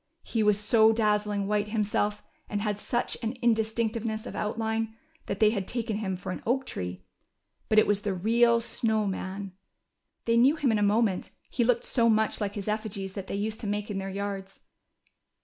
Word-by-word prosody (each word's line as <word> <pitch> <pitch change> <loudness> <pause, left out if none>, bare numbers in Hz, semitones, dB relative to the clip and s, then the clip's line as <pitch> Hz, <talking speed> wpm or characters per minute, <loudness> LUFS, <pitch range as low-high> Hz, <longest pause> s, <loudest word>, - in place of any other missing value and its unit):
He 225 - -1
was 210 -1 +3
so 220 +1 +5
dazzling 210 -2 +1
white 210 +1 0
him 215 0 0
self, 210 0 -1 0.3
and 205 - -1
had 210 -1 -1
such 240 +3 -1
an 225 0 -2
indistinctness 225 -2 0
of - - -7
outline, 220 +1 -2 0.3
that 195 - -3
they 215 -1 +5
had 200 -4 -2
taken 225 -3 -2
him 190 -4 -2
for 180 - -5
an - - -5
oak 265 +3 0
tree. 90 0 -5 0.6
But 215 - +3
it 215 - +7
Avas 205 -1 +2
the 205 -3 -1
real 230 +5 +4
Snow 220 -2 0
Man. 195 0 -4 0.7
They 230 0 +3
knew 265 +6 +5
him 285 -6 +1
in 215 - +2
a - - 0
moment, 205 -2 +2 0.2
he 240 - +1
looked 235 0 +2
so 230 -2 +3
much 220 -1 +2
like 205 -1 -2
his 205 -1 -5
effigies 210 -3 -3
that 195 -1 -6
they - - -3
used 215 +2 -2
to 215 - -4
make 210 +1 -2
in 195 - -2
their 195 0 -4
yards. 195 0 -5
215 Hz, 200 wpm, -28 LUFS, 200-225 Hz, 0.7 s, it